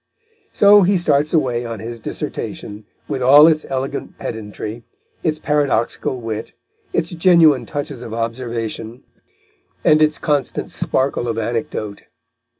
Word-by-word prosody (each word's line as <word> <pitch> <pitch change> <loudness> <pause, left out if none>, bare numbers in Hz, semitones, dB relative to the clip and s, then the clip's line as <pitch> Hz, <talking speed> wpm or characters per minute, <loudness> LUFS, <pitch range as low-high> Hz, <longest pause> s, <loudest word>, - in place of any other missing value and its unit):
So 205 0 +6
he 195 +1 +3
starts 150 -3 +1
away 125 -7 +1
on 115 -2 -6
his 115 +2 -7
dissertation, 105 -1 -6 0.2
with 130 - -3
all 140 +4 +8
its 155 -1 +2
elegant 135 0 -4
pedantry, 110 +1 -6 0.4
its 155 -2 0
paradoxical 140 -5 0
wit, 110 -2 -5 0.4
its 165 0 -1
genuine 165 -5 +4
touches 145 -4 -5
of 120 -3 -8
observation 115 0 -4 0.8
and 155 0 +4
its 155 -1 +3
constant 145 -3 -1
sparkle 130 -2 0
of 115 -1 -2
anecdote. 110 -2 -4
130 Hz, 125 wpm, -19 LUFS, 115-155 Hz, 0.8 s, all